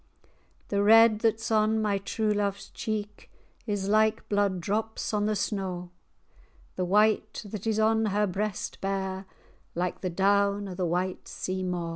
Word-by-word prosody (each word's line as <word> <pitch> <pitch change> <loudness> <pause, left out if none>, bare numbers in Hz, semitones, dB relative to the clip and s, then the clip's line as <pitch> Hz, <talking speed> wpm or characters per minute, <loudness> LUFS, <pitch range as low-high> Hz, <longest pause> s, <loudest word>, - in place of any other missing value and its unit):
[#] - - -41
soon. - - -31 0.4
The 200 0 +1
red 225 0 +7
that's 225 0 0
on 220 0 +3
my 205 -2 0
true 210 +2 -1
love's 200 -1 -2
cheek 210 -1 -5 0.4
Is 205 -2 -1
like 215 +1 +2
blood 205 -2 +1
drops 220 +5 -2
on 210 0 +1
the 215 - +1
snaw; 190 -3 -3 0.9
The 185 - -1
white 215 +3 +2
that 205 +1 -6
is 220 -1 +1
on 220 0 +3
her 210 +1 +1
breast 205 +1 -3
bare, 190 -1 -3 0.5
Like 180 +1 -2
the 185 - -1
down 200 +2 +2
o' 190 - -6
the 180 -1 -1
white 180 +2 -2
sea 185 0 -4
maw. 180 -2 -2
205 Hz, 165 wpm, -28 LUFS, 190-215 Hz, 0.9 s, red